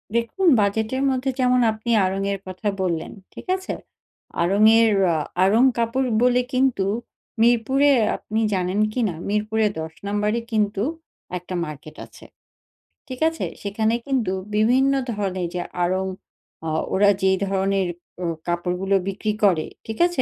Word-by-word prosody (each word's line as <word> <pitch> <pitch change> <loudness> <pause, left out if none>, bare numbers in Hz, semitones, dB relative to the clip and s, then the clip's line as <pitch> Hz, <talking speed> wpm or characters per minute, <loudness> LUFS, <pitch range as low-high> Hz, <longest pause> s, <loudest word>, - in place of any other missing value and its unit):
দেখুন 235 +11 0
বাজেটের 220 +5 0
মধ্যে 260 0 -1
যেমন 250 0 +3
আপনি 220 +2 -4
আড়ং 190 +1 -1
এর 195 - -3
কথা 185 +3 -5
বললেন। 170 -3 -2 0.2
ঠিক - - -11
আছে? 375 0 -5 0.7
আড়ং 195 +5 +2 0.2
এর 225 -1 +4 0.2
আ - - +1 0.3
আড়ং 215 +6 +4
কাপড় 235 +3 0
বলে 250 0 +4
কিন্তু 255 -6 +2 0.6
মিরপুরে 245 +5 +3 0.3
আপনি 220 +1 -3
জানেন 185 +2 0
কি 250 - -1
না 165 - -5
মিরপুরে 215 +1 +1
১০ 160 0 -6
নাম্বারে 210 +3 0
কিন্তু 210 -2 0 0.5
একটা 180 +1 -8
মার্কেট 150 0 -9
আছে। - - -16 0.8
ঠিক 255 -1 -7
আছে? 325 - -4 0.2
সেখানে 220 +2 0
কিন্তু 255 -9 0 0.2
বিভিন্ন 255 +6 +3 0.2
ধরনের 190 -4 -2
যে 180 - -2 0.2
আড়ং 185 +2 0 0.6
আ - - -1 0.2
ওরা 200 +1 +4
যেই 190 0 +3
ধরনের 195 -1 0 0.4
অ - - -1 0.2
কাপড়গুলো 180 +3 0
বিক্রি 210 +2 -2
করে, 175 -6 +3 0.2
ঠিক 220 0 -5
আছে? 350 -7 -1
210 Hz, 145 wpm, -22 LUFS, 190-240 Hz, 0.8 s, এর